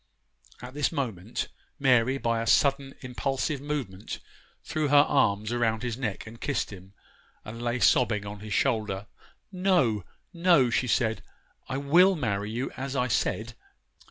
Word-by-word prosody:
At 125 +1 -8
this 145 0 0
moment, 115 -6 -3 0.3
Mary, 130 -2 +3
by 115 -3 0
a 115 - -4
sudden, 135 +2 +2
impulsive 135 +2 -2
movement, 135 -10 -4 0.5
threw 155 -1 -1
her 145 +1 +6
arms 105 -5 +2
around 115 -2 0
his 120 -2 -2
neck 115 -6 -4
and 115 +1 -12
kissed 140 -6 -1
him, 95 +1 -13 0.5
and 115 +2 -7
lay 120 +1 -1
sobbing 110 -4 +3
on 100 0 -7
his 105 +1 -9
shoulder. 105 -3 0 0.5
'No, 180 - +2 0.3
no,' 170 -8 +4
she 125 - +1
said, 110 -2 +1 0.5
'I 130 - -2 0.2
will 185 +2 +7
marry 105 - -2
you 120 +4 -3
as 135 +1 -5
I 125 -2 +1
said. 115 0 -1
120 Hz, 150 wpm, -27 LUFS, 110-140 Hz, 0.5 s, will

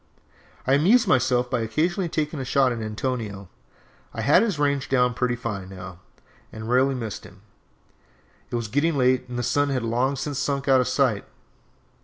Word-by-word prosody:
I 130 - +2
amused 205 - +4
myself 125 -4 +2
by 125 -1 -1
occasionally 170 - -1
taking 155 -1 -2
a - - -3
shot 130 0 +2
at 115 -2 -4
Antonio. 110 -3 -4 0.7
I 115 - -3
had 140 - +5
his 220 -8 0
range 140 -2 0
down 125 -2 +2
pretty 125 +1 0
fine, 105 -6 -5
now, 90 -2 -9 0.5
and 110 0 -8
rarely 130 +3 +2
missed 115 -5 -5
him. 100 0 -16 1.1
It - - -4
was 115 -2 -2
getting 145 +7 +1
late, 125 -1 +2
and 120 - -5
the 120 - -1
sun 145 +3 +1
had 130 -3 -1
long 125 +4 0
since 140 0 -4
sunk 140 -1 -2
out 135 -1 +5
of 125 - -1
sight. 125 -5 +1
125 Hz, 180 wpm, -24 LUFS, 115-140 Hz, 1.1 s, had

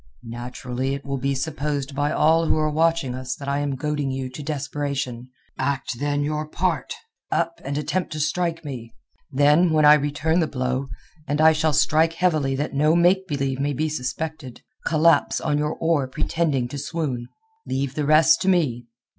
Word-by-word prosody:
"Naturally 125 +3 -4
it 140 - -9
will 140 -1 -3
be 135 +1 0
supposed 145 0 -3
by 145 +2 0
all 165 +1 +3
who - - +2
are 155 0 +1
watching 160 -4 +1
us 130 0 -4
that 140 - -9
I 140 +1 0
am 145 -1 -1
goading 145 0 -2
you 130 -1 -4
to 140 - -8
desperation. 140 -4 -3 0.3
Act, 130 -3 -2
then, 145 0 0
your 150 +1 -2
part. - - -1 0.4
Up, 335 - -1
and 140 +1 -3
attempt 175 +4 -2
to 155 - -4
strike 165 +1 -1
me. 120 -5 -7 0.4
Then 150 +5 +4
when 155 -1 +4
I 150 - +9
return 150 +3 +1
the 160 - +2
blow—and 140 +3 -4
I 160 +1 +7
shall 155 0 +1
strike 160 +2 +3
heavily 155 -6 +1
that 145 +3 -3
no 150 +3 +3
make 185 +2 +3
believe 135 -3 -2
may 145 +1 0
be 155 +4 -1
suspected—collapse 155 - 0
on 150 -2 0
your 150 +1 -1
oar 160 -5 +1
pretending 135 -1 -1
to 140 - -5
swoon. 140 -5 -3 0.4
Leave 135 0 -2
the 150 -1 -2
rest 155 +1 +5
to - - -2
me. 130 -10 +1
145 Hz, 175 wpm, -23 LUFS, 135-155 Hz, 0.4 s, I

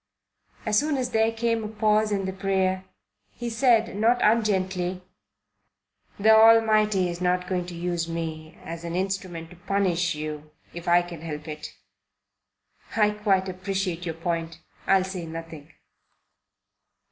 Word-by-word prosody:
As 210 -1 +3
soon 295 0 0
as 250 -1 -2
there 220 0 +3
came 230 0 -1
a - - -3
pause 215 0 +1
in 195 -2 0
the 190 - -3
prayer, 190 -1 0 0.5
he 240 -1 -5
said 230 -3 +3
not 230 +4 +3
ungently: 190 -4 +1 1.2
"The 220 +2 +5
Almighty 215 -3 +5
is 175 0 -5
not 180 0 +1
going 180 -2 -2
to 175 - -7
use 170 -1 -2
me 160 -1 -5
as 165 0 -7
an 170 0 -4
instrument 185 -3 -3
to 180 - -13
punish 175 -3 0
you, 150 0 -6 0.2
if 170 0 -8
I 175 0 +5
can 175 -3 -9
help 155 -1 -6
it. 155 0 -7 1.2
I 210 -1 +4
quite 200 -3 +1
appreciate 185 -1 -3
your 165 - -3
point. 165 -1 -3 0.3
I'll 195 -1 +4
say 185 -3 -5
nothing." 165 -1 -8
185 Hz, 145 wpm, -25 LUFS, 170-210 Hz, 1.2 s, The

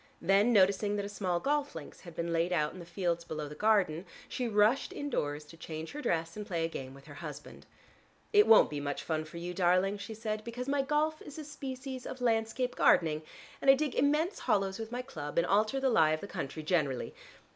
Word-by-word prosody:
Then 195 +6 +4
noticing 200 0 +4
that 205 -1 -2
a - - -5
small 185 -4 -1
golf 290 +5 0
links 155 -3 -9
had 170 -3 -12
been 170 0 -2
laid 165 +2 +1
out 150 -4 +1
in 185 - -10
the 170 - -10
fields 175 -2 -1
below 155 -2 -5
the 145 - -8
garden, 190 -2 +2 0.2
she 250 - -2
rushed 215 +4 +3
indoors 150 - -3
to 165 +2 -14
change 160 -1 -6
her 295 - -6
dress, 165 - -1
and 210 - -5
play 170 -6 -1
a - - -2
game 135 -4 -7
with 135 0 -15
her 145 - -11
husband. 150 -2 -9 0.7
"It 415 0 +6
won't 220 - +7
be 145 - -3
much 145 0 -3
fun 155 -1 -2
for 155 +2 -10
you, 175 +1 -4
darling," 185 +2 +2
she 220 +2 -7
said, 215 -1 -3
"because 245 +2 -5
my 280 0 +2
golf 300 +3 0
is 290 - -10
a 310 - -5
species 265 -2 -6
of 260 - -6
landscape 240 +1 0
gardening, 155 -2 +4 0.4
and 275 - +3
I 270 - +10
dig 295 -1 -1
immense 300 +8 +1
hollows 195 0 0
with 225 0 -6
my 250 +1 -3
club 150 - -7
and 170 - +4
alter 215 +7 +2
the 265 - +1
lie 155 -7 +5
of 155 - -2
the - - -5
country 155 -5 -5
generally. 150 -6 0
195 Hz, 225 wpm, -31 LUFS, 165-250 Hz, 0.7 s, I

